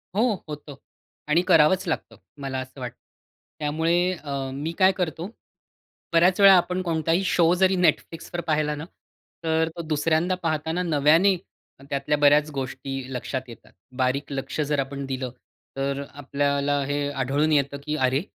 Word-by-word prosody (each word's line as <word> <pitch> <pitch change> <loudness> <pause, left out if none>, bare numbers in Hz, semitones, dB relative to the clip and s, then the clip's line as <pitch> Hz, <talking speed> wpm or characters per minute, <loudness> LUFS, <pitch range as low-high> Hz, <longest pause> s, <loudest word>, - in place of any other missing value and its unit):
हो, 225 +1 +2
होतं. 150 -1 -8 0.5
आणि 165 +3 +4
करावंच 180 +2 +4
लागतं, 160 - -3 0.3
मला 135 -1 -3
असं 130 +1 -9
वाटतं. 125 -2 -6 0.6
त्यामुळे 160 +3 +1 0.3
अ, 140 -2 -3
मी 145 +4 -3
काय 190 -1 +6
करतो? 175 0 -3 0.8
बऱ्याच 180 +3 +4
वेळा 195 -1 +9
आपण 180 +1 0
कोणताही 165 +1 0
शो 170 -1 +3
जरी 190 +1 +3
Netflixवर 170 0 0
पाहिला 150 -1 +1
ना, 150 +2 -6 0.6
तर 160 0 +1
तो 170 - -4
दुसऱ्यांदा 160 +3 +1
पाहताना 160 +2 -1
नव्याने, 165 +4 +4 0.5
त्यातल्या 145 +2 0
बऱ्याच 145 +1 +4
गोष्टी 135 -1 -5 0.2
लक्षात 130 +1 -3
येतात. 115 -2 -13 0.3
बारीक 130 +3 0
लक्ष 135 +2 -4
जर 145 -1 0
आपण 140 +1 -3
दिलं, 130 -1 -4 0.5
तर 140 0 -1
अ, - - -6
आपल्याला 140 0 0
हे 145 +1 -1
आढळून 140 +3 0
येतं 140 -1 +1
की 150 0 -1
"अरे, 130 0 +1
150 Hz, 145 wpm, -25 LUFS, 140-165 Hz, 0.8 s, वेळा